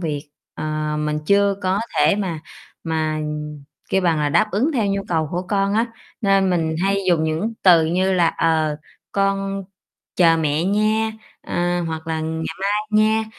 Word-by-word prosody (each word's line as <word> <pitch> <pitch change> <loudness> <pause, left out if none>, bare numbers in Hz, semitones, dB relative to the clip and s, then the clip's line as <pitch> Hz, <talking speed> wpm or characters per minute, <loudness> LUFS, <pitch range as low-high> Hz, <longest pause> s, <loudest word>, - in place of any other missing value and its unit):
việc, 150 -3 -4 0.2
ờ, 155 0 -2
mình 150 0 -1
chưa 200 +1 +4
có 190 +2 +1 0.2
thể - - +4
mà 180 -6 -3 0.4
mà, 155 -1 -1 0.7
kiểu, 190 - +2
bằng 170 -3 +2
là 150 -1 +1
đáp 145 - +2
ứng 235 - +1
theo 225 -5 +1
nhu 195 0 -1
cầu 160 -3 0
của 175 +1 -2
con 200 -1 +1
á, 225 +2 +2 0.3
nên 195 -3 +3
mình 160 -3 0
hay 195 +1 +2
dùng 165 -3 +3
những 160 +8 -1
từ 170 -4 +6
như 185 +3 +1
là, 175 -3 +3
"ờ, 155 -2 +1 0.4
con 195 0 0 0.5
chờ 165 -2 +5
mẹ 155 0 0
nha", 215 +3 +1 0.3
ờ, 175 0 -1
hoặc 160 -1 -5
là 160 -1 -2
"ngày 160 0 -3 0.2
mai 200 +1 0 0.2
nha", 215 +1 +3
175 Hz, 170 wpm, -21 LUFS, 160-195 Hz, 0.7 s, từ